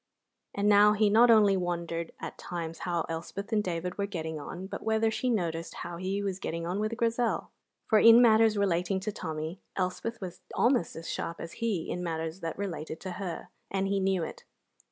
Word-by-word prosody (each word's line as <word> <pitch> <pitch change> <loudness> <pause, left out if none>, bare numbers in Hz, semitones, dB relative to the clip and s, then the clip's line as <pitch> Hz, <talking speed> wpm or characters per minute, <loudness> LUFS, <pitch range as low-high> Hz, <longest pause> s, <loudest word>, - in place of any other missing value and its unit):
And 200 +1 +1
now 210 0 +7
he 210 -1 +3
not 235 +3 +6
only 210 -3 +6
wondered 170 -2 -2
at - - -7
times 165 -2 -5
how 170 -2 -1
Elspeth 200 +6 -5
and 210 -1 +3
David 180 +1 -3
were 200 - 0
getting 160 -5 -4
on, 175 +5 -7
but 190 - -6
whether 220 0 +2
she 255 +3 -1
noticed 170 -7 -1
how 170 0 -6
he 190 +3 -2
was 195 -2 -2
getting 165 -2 -3
on 180 +4 -2
with 215 +2 -1
Grizel; 235 0 0 0.3
for 220 - +4
in 230 +1 +9
matters 220 -2 +5
relating 190 -1 +1
to 215 +2 -2
Tommy 160 0 -5 0.2
Elspeth 190 +5 -2
was 180 -3 -7
almost 240 - +2
as 165 0 -7
sharp 170 - -4
as 165 - -6
he 210 -8 0
in 180 - -3
matters 165 0 -3
that 165 -3 -4
related 165 -5 -4
to 190 - -5
her, 180 -4 -5 0.2
and 195 0 0
he 200 0 +1
knew 190 -2 +1
it. - - -7
190 Hz, 195 wpm, -29 LUFS, 170-210 Hz, 0.3 s, in